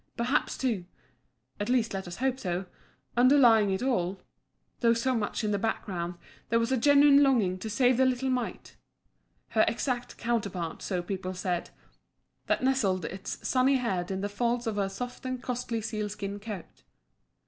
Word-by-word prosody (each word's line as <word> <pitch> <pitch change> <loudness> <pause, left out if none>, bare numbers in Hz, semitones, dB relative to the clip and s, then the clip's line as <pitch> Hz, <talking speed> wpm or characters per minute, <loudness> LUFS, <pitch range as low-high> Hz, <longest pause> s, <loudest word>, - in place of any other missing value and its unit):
Perhaps, 245 +5 0
too 225 -9 -1 0.7
at 205 - -2
least, 245 -4 +2
let 190 -1 -4
us 175 - -6
hope 260 +3 -1
so 180 -2 -2 0.5
underlying 240 -4 +6
it 190 +4 -1
all, 190 -7 0 0.6
though 230 -1 +4
so 255 +3 +1
much 225 0 -2
in 210 - 0
the 205 - 0
background, 180 -5 -2 0.3
there 230 - +3
was 230 +2 0
a - - +4
genuine 285 +2 +6
longing 220 -10 +3
to 220 - -5
save 245 +2 +3
the 260 - +4
little 260 +1 0
mite 245 -7 -4 0.7
her 220 - +3
exact 245 +1 -2
counterpart, 200 -8 -2
so 180 -2 -2
people 185 0 -4
said 180 -1 -2 0.8
that - - +1
nestled 205 -10 +1
its 190 +1 -5
sunny 260 +1 +3
head 190 -9 -1
in 190 0 -2
the 200 - -1
folds 235 +4 -1
of 220 -2 -2
her 195 -1 0
soft 245 +7 -6
and 255 -1 -4
costly 245 -2 -2
sealskin 210 -2 -4
coat. 205 -4 -8
225 Hz, 165 wpm, -29 LUFS, 195-250 Hz, 0.8 s, underlying